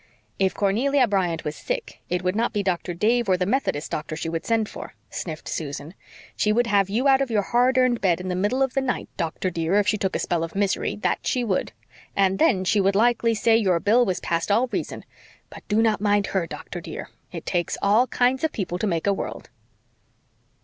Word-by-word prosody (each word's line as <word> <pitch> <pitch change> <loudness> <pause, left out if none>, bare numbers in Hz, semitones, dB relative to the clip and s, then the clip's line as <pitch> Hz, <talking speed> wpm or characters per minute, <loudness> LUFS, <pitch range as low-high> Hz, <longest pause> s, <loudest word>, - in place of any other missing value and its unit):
"If 190 -1 +1
Cornelia 250 +7 +2
Bryant 180 -5 0
was 150 0 -4
sick, - - -5
it 180 0 -1
would 185 +1 0
not 235 +2 0
be 205 -2 0
Doctor 180 -2 -2
Dave 225 +4 +1
or 185 - +4
the 180 - 0
Methodist 200 - -1
doctor 155 +1 -3
she 165 +1 -4
would 165 0 -4
send 225 -2 +1
for," - - -9 0.2
sniffed 155 -3 -6
Susan. 145 +1 -5 0.4
"She 210 - +1
would 240 +3 +3
have 200 -3 +2
you 240 +7 +1
out 270 0 +5
of 270 - 0
your 210 -3 +1
hard 250 +4 +2
earned 255 -2 +3
bed 180 -3 +2
in 185 - -6
the 180 - -1
middle 210 +9 +1
of 265 - -1
the 270 - +1
night, 255 -2 -2
doctor, 170 +2 -2
dear, 165 +2 0
if 205 -1 +3
she 210 0 +1
took 190 -2 -1
a - - +3
spell 170 -2 -1
of 165 - -6
misery, 200 -1 0
that - - +1
she 250 - +1
would. 195 - -1 0.4
And 195 -1 +2
then 220 - +3
she 205 +2 +3
would 195 +1 +2
likely 230 +1 +3
say 225 +2 +3
your 190 -6 +2
bill 225 +7 +4
was 185 -6 -1
past 170 +2 -1
all 225 +5 +3
reason. - - -4 0.5
But - - -12
do 215 +1 +2
not 215 -3 +1
mind 205 -1 +2
her, 190 -4 -1
doctor, - - -7
dear. - - -8 0.2
It - - -7
takes 175 -2 -1
all 215 +6 +3
kinds 255 +3 +1
of 320 - +1
people 180 - -3
to 215 - 0
make 170 -4 -1
a 200 - +3
world." - - -6
200 Hz, 225 wpm, -24 LUFS, 180-235 Hz, 0.5 s, out